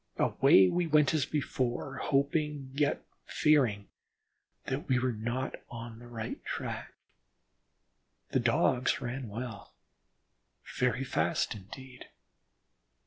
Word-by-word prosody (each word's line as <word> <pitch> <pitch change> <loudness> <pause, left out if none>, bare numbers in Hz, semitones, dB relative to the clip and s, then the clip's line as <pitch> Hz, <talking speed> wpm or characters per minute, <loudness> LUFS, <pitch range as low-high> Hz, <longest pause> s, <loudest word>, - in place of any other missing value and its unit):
Away 95 0 +5
we 175 - +1
went 150 -2 +4
as 150 -4 +1
before, 135 -2 -2
hoping, 145 0 0
yet 145 +1 0 0.2
fearing 125 -10 +2 0.8
that - - -3
we 130 - +4
were 125 +1 +1
not 120 +4 -3 0.2
on 115 -1 -8
the 120 - -12
right 115 -2 -6
track. - - -5 1.4
The - - +2
Dogs 125 +1 +2
ran 125 -1 -4
well, 110 - -7 1.0
very 125 +1 +2
fast 85 -10 0
indeed. 125 +6 -11
125 Hz, 105 wpm, -31 LUFS, 115-140 Hz, 1.4 s, Away